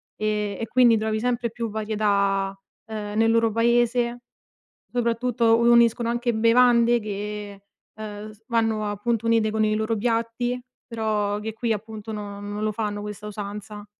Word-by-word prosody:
ehm, 210 -2 -1
e 225 - -1
quindi 240 -1 +5
trovi 220 0 -1
sempre 240 -1 -1
più 230 -1 -4
varietà, 200 -2 0 0.3
ehm, 210 -1 -5
nel 225 0 +4
loro 230 -1 +3
paese, 240 +1 +2 0.7
soprattutto 235 -1 +2
uniscono 235 0 +4
anche 240 0 0
bevande 235 +1 +4
che, 205 -1 -6 0.3
ehm, 215 0 -7 0.2
vanno 225 -3 0
appunto 230 +2 -2
unite 225 -1 +3
con 220 0 0
i 215 0 +2
loro 220 +1 0
piatti, 230 +2 -1 0.2
però 215 -3 -1
che 220 +1 -5
qui 230 +1 -2
appunto 220 0 -5
non 205 -1 -6
non 210 +1 -3
lo 215 - +1
fanno 210 -1 -3
questa 210 0 -7
usanza. 210 0 -7
220 Hz, 145 wpm, -24 LUFS, 210-235 Hz, 0.7 s, quindi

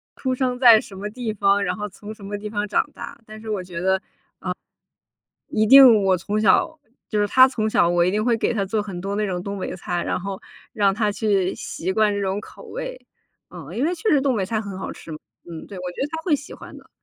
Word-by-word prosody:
出 260 -1 -2
生 250 -1 -1
在 235 -4 +8
什 195 - -10
么 205 +2 -5
地 225 -1 -4
方， 200 0 +2
然 180 -2 -1
后 210 0 -5
从 205 +2 -10
什 210 -2 -15
么 205 +1 -4
地 210 +1 -6
方 205 -1 -2
长 255 - +1
大。 280 0 -9
但 215 0 -10
是 220 - -8
我 205 -3 -1
觉 175 -2 -7
得， 190 +1 +3
呃， 190 - -5 1.5
一 215 0 +1
定 250 -5 +8
我 190 -1 +3
从 205 +4 -2
小 315 - +3 0.3
就 210 -2 0
是 205 - +2
他 260 +5 +6
从 220 -4 -1
小 170 - +3
我 175 0 +3
一 180 - +2
定 215 +1 0
会 235 -2 +2
给 225 - 0
他 200 - 0
做 210 +2 -1
很 195 -4 -6
多 200 +2 -3
那 210 - 0
种 180 -2 -3
东 200 0 -5
北 185 - -4
菜， 175 -1 -3
然 - - -1
后 195 0 -5 0.3
让 200 -4 +2
他 210 -1 +1
去 200 -3 0
习 185 +3 -4
惯 215 -1 +2
这 200 - -2
种 195 +1 -1
口 - - -13
味。 - - -6 0.5
啊， - - -10
因 255 - 0
为 345 - +1
确 430 - -2
实 285 - +4
东 265 -4 +1
北 190 -2 -1
菜 220 +1 -1
很 200 -3 -7
好 - - -5
吃 165 - -12
嘛， 155 - -6 0.3
嗯， 165 -1 -8
对， 200 - -10
我 180 0 -5
觉 180 - -9
得 275 - +1
他 320 0 -4
会 315 -4 +2
喜 290 - -11
欢 - - -12
的。 - - -20
210 Hz, 280 characters per minute, -22 LUFS, 190-230 Hz, 1.5 s, 在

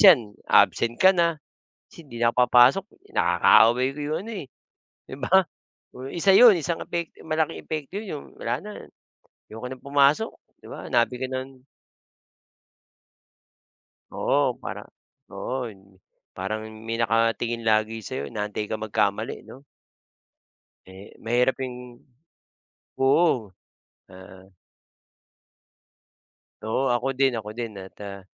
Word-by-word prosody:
'yan 135 - +6 0.2
absent 115 0 +4
ka 190 - +6
na, 170 -2 +2 0.6
kasi 170 - -14
hindi 120 -4 -10
na 115 - +4
ako - - -7
papasok, 125 +10 +5 0.3
"Nakaaway 110 +8 +5
ko - - -8
'yong 150 +2 -2
ano, - - -6
eh." - - -12 0.6
'Di 130 - -9
ba? 155 +9 +1 0.6
Oh, 130 +1 -8
1 185 +3 +2
'yon, 230 -1 +8
isang 165 +1 -3
epekto 170 -1 -5
malaking 155 0 -1
epekto 155 -1 -6
'yon 220 - -9
'yong, 150 - -6 0.2
"Wala 120 +1 -1
na, 210 - -8 0.8
ayoko 110 +3 -7
nang 130 - -11
pumasok." 140 +8 +3 0.3
'Di - - -16
ba? - - -8
Nabi - - +2
ka 130 - -2
ng 130 0 -6 2.5
Oo. - - +1
Parang, - - -8 0.4
oo, 125 -2 -4
yung 95 -2 -19 0.3
parang 110 +4 -4
may 110 +1 -6
nakatingin 115 0 0
lagi 110 0 +1
sa'yo, 70 -7 -5
inaantay 105 0 -3
ka 110 - -4
magkamali 105 0 -1
'no? 135 - -13 1.3
Eh, 95 +2 -13
mahirap 120 +4 +1
yung 125 -2 -7 1.0
oo, 135 - +2 0.6
ah. 95 0 -14 2.2
Oo, 125 +4 0
ako 125 +2 -1
din, 135 0 +3
ako 105 +1 -9
din. 120 -2 -4
At, 95 0 -12
ah, 100 -1 -7
120 Hz, 125 wpm, -25 LUFS, 110-140 Hz, 2.5 s, yon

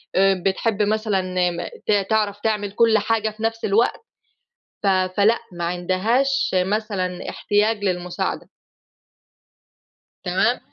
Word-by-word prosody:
آآ 190 -1 +3
بتحِب 205 +2 0
مثلًا 210 -2 0 0.3
م 175 0 -5 0.2
ت - - +3 0.2
تعرف 210 -2 +1
تعمل 210 -2 -1
كل 225 +1 +4
حاجة 220 +1 0
في 215 +1 -10
نَفْس 225 0 -1
الوقت، 215 +4 +2 0.8
ف - - -1
فلأ 195 +4 +3
ما 170 -1 -4
عندهاش 210 +11 +1
مثلًا 185 -1 -1
احتياج 210 0 0
للمساعدة. 180 -2 -2 1.8
تمام؟ - - +1
205 Hz, 110 wpm, -22 LUFS, 185-220 Hz, 1.8 s, كل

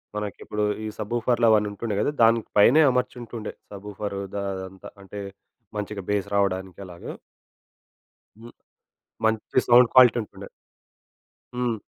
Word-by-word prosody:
మనకిప్పుడు 105 0 -4 0.2
ఈ - - -3
సబూఫర్‌లవన్నీ 115 -1 +2
ఉంటుండే 105 0 -4
కదా! 145 - +1
దాని 115 +1 +5 0.2
పైనే 130 +10 +6
అమర్చుంటుండే 120 -3 -4 0.2
సబూఫరు 100 0 -6
దా 100 - -2
అదంతా. 95 +1 -9
అంటే 100 +1 -9 0.6
మంచిగా 105 -1 -4
బేస్ 100 -2 0
రావడానికి 95 -2 -1
అలాగ. 85 -1 -12 1.3
హ్మ్. 115 +1 -13 0.7
మంచి 110 +3 +1
సౌండ్ 120 0 +7
క్వాలిటీ 125 -2 +7
ఉంటుండే. 105 - -12 1.1
హ్మ్. 120 -3 -1
105 Hz, 110 wpm, -24 LUFS, 100-120 Hz, 1.3 s, సౌండ్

